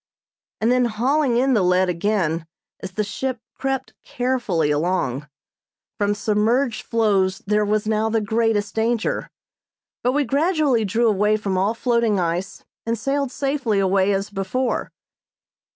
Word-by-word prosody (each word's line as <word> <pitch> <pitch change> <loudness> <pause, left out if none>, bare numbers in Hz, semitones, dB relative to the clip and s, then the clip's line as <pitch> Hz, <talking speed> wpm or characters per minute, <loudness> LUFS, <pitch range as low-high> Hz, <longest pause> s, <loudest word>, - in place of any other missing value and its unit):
and 225 +2 +2
then 250 0 +3
hauling 245 +3 +1
in 265 +2 +3
the 215 - +3
lead 180 +1 +3
again 170 -3 -1 0.3
as 190 0 -7
the 215 - 0
ship 250 +4 -3
crept 270 -1 -3
carefully 240 - 0
along. 150 -3 -1 0.7
From 205 0 +1
submerged 220 +4 +1
floes 200 -5 +1
there 210 +1 +2
was 210 +1 0
now 220 0 +1
the 225 0 +1
greatest 215 -1 0
danger, 225 0 -1 0.7
but 250 - +1
we 290 +1 +2
gradually 280 - +1
drew 230 +4 +1
away 210 0 +2
from 200 -3 -2
all 195 +5 +1
floating 235 -4 +1
ice 175 +2 -3 0.2
and 230 0 -1
sailed 275 +3 -1
safely 275 -7 -1
away 195 0 +2
as 195 +1 -1
before. 205 +6 -2
215 Hz, 140 wpm, -22 LUFS, 195-245 Hz, 0.7 s, then